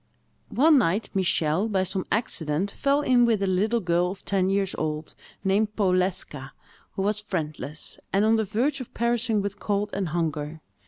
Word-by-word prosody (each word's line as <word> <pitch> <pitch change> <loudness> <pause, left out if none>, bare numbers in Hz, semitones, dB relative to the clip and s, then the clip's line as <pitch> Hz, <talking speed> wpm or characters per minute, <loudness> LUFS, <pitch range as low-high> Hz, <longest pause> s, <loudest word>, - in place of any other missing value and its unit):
One 300 +2 +5
night, 205 0 0
Michel, 180 -1 +1
by 190 -3 +1
some 190 0 -3
accident, 195 -5 0
fell 280 +5 +1
in 255 -4 +4
with 225 -4 +2
a - - +2
little 205 +5 +1
girl 175 0 +1
of 190 +1 -9
ten 190 -2 +1
years 195 -1 0
old, 155 0 -3 0.3
named 210 +2 +1
Powleska, 180 -8 0 0.4
who 190 - -2
was 210 +1 0
friendless, 155 -6 -5
and 200 +2 +3
on 220 +1 +4
the 220 - +2
verge 250 +8 -1
of 250 - -9
perishing 230 -3 +1
with 200 0 -4
cold 205 0 -1
and 195 -3 -1
hunger. 155 -1 -2
195 Hz, 170 wpm, -26 LUFS, 175-220 Hz, 0.4 s, One